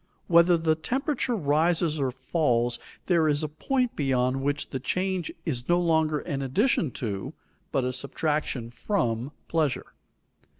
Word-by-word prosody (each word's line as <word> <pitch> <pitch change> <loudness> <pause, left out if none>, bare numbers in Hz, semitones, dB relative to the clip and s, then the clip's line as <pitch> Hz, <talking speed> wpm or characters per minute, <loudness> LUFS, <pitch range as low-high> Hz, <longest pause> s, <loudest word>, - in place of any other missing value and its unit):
Whether 170 0 +5
the 160 -1 +2
temperature 255 - -1
rises 160 -1 +1
or 135 -2 +1
falls, 125 -3 0 0.3
there 170 -3 +3
is 150 0 +2
a - - 0
point 250 - -1
beyond 130 -2 +1
which 145 +1 -1
the 130 - -2
change 185 +4 -1
is 125 -6 -2
no 175 0 +4
longer 160 -3 +2
an 140 -5 -3
addition 155 - +2
to, 100 -5 -4 0.4
but 135 - +1
a 125 0 -1
subtraction 140 -3 -2
from, 120 - -1 0.2
pleasure. 155 -5 -1
155 Hz, 140 wpm, -27 LUFS, 130-170 Hz, 0.4 s, Whether